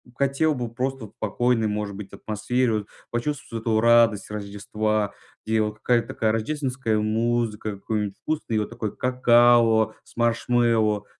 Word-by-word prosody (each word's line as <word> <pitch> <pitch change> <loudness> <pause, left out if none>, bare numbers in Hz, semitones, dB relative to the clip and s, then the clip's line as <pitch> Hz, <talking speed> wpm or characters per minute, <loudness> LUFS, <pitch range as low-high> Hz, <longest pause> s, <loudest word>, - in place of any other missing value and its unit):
хотел 140 +3 +1
бы 120 -3 -4
просто 130 0 -3
вот 105 - -14
в - - -48
спокойной 115 +1 +1
может 105 -1 -3
быть 100 -1 -9
атмосфере 115 +3 -1
вот, 105 -2 -2 0.2
почувствовать 120 -2 -3
эту 110 -2 +2
радость 115 -3 +4
Рождества, 105 +1 -2 0.3
где 110 0 +1
вот 105 0 -2
какая-то 120 +2 +1
такая 110 -1 0
рождественская 125 -1 -1
музыка, 110 0 0
и - - -2
какое-нибудь 105 0 -3
вкусное 155 -8 -2
вот 105 - -2
такое 120 -3 -3
какао 120 -3 +4
с - - -22
маршмэллоу, 115 -3 +2
115 Hz, 150 wpm, -24 LUFS, 105-120 Hz, 0.3 s, радость